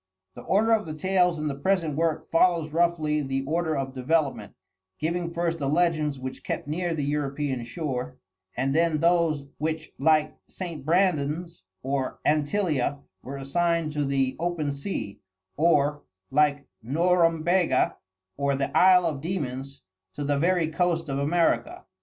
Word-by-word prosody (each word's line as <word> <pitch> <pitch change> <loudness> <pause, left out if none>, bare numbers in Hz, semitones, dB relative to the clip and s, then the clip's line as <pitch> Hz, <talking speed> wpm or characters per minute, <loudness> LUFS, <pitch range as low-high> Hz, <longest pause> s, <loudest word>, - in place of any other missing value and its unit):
The - - -10
order 215 +4 +2
of 220 -5 +2
the 155 - -5
tales 180 0 +2
in 155 - -3
the 145 - -1
present 160 +1 0
work 160 0 -1
follows 165 -2 +3
roughly 160 -3 +1
the 135 -1 -2
order 160 0 0
of 135 -1 -3
development, 140 +3 -1 0.4
giving 170 +2 -2
first 170 -1 -1
the 140 -2 -1
legends 155 -3 +1
which 130 0 -7
kept - - -4
near 170 +2 -1
the 150 - -2
European 140 -2 -2
shore, 130 -2 -4 0.4
and 135 +1 0
then 165 0 +2
those 165 -3 +2
which, 155 +1 -3
like 155 +1 +3
St. 170 -6 -6
Brandan's 165 - 0 0.2
or 135 0 -2
Antillia, 150 -2 +1 0.2
were 140 +2 -7
assigned 165 +3 0
to 150 -1 -1
the 135 -1 0
open 165 -4 -1
sea 140 - -5 0.4
or, 145 -2 +2 0.3
like 145 0 +2 0.2
Norumbega 165 +2 +2 0.4
or 140 0 +1
the 135 0 -3
Isle 180 -1 +6
of 150 -5 -2
Demons, 140 -5 -4 0.3
to 145 - -4
the 145 0 0
very 175 0 +2
coast 165 -1 0
of 135 0 -1
America. 175 - 0
155 Hz, 145 wpm, -26 LUFS, 140-170 Hz, 0.4 s, Isle